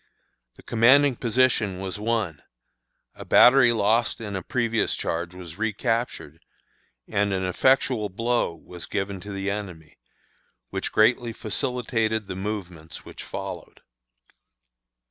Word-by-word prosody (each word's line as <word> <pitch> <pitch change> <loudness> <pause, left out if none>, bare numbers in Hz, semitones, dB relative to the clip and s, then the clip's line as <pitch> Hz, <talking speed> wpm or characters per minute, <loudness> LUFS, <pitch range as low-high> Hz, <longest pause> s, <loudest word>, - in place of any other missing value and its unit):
The - - -17
commanding 130 +4 +4
position 115 -5 +1
was 95 +1 -5
won; 105 -9 -1 0.7
a - - -10
battery 125 -1 +6
lost 115 +2 +1
in 105 -3 -5
a 95 - -3
previous 115 +2 0
charge 85 +2 -3
was 90 0 -10
recaptured, 110 - -2 0.7
and 100 -1 0
an 95 -1 -1
effectual 115 +2 +2
blow 115 -2 -1
was 90 +1 -11
given 100 -1 -3
to 100 +3 -9
the 100 0 -2
enemy, 90 -7 -7 0.7
which - - -3
greatly 115 +1 +3
facilitated 110 -2 -1
the 95 - -6
movements 90 -5 -6
which - - -10
followed. - - -7
105 Hz, 120 wpm, -25 LUFS, 95-115 Hz, 0.7 s, battery